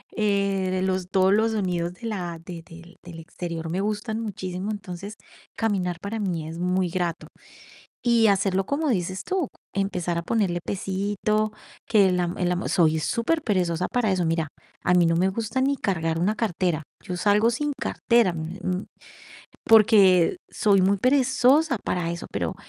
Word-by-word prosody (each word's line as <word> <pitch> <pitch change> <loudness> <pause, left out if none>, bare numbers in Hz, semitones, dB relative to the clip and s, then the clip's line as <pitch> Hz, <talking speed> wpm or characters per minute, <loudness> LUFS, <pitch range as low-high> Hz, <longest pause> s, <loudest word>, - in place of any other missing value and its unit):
eh, 200 -3 +1
de 185 0 -1
los 185 -1 -1
todos 190 0 +4
los 220 +2 +2
sonidos 180 -5 -1
de 230 - -21
la 175 -6 -4
de 175 -2 -7
del 170 +2 -14
del 175 -2 -10
exterior 165 0 -6
me 185 +4 -1
gustan 215 +2 -2
muchísimo, 195 -1 -4
entonces, 200 0 -7 0.4
caminar 190 -6 -1
para 215 +3 -4
mí 175 -6 -2
es 165 +1 -7
muy 180 0 0
grato. 175 -1 -3 0.8
Y 235 -2 +4
hacerlo 195 -1 +1
como 295 +2 -1
dices 185 -3 -1
tú, 370 -7 -1 0.3
empezar 180 -3 -1
a - - -2
ponerle 180 -3 0
pesito, 205 +2 -1 0.4
que 200 -4 +4
la 180 -1 0
ma 175 - -6
el 180 0 +1
amo 180 - -2
Soy 160 -3 +3
superperezosa 185 - 0
para 235 -5 +1
eso. 180 -2 0
Mira, 165 -1 0 0.4
a 180 - +3
mí 175 -2 +5
no 165 0 +2
me 185 +2 +3
gusta 225 +6 -2
ni 275 +1 +2
cargar 165 -8 -1
una 210 +5 +1
cartera, 175 -7 -1 0.2
yo 180 - -4
salgo 210 +4 +3
sin 290 +5 -1
cartera, 235 -6 +2
mm, 160 +1 -5
eh, - - -11
mm, 185 +1 -2 0.8
porque 210 - +6
soy 200 -2 +3
muy 195 +2 +3
perezosa 265 +4 +3
para 175 -2 -1
eso, 170 0 -5
pero - - -2
190 Hz, 170 wpm, -25 LUFS, 175-215 Hz, 0.8 s, porque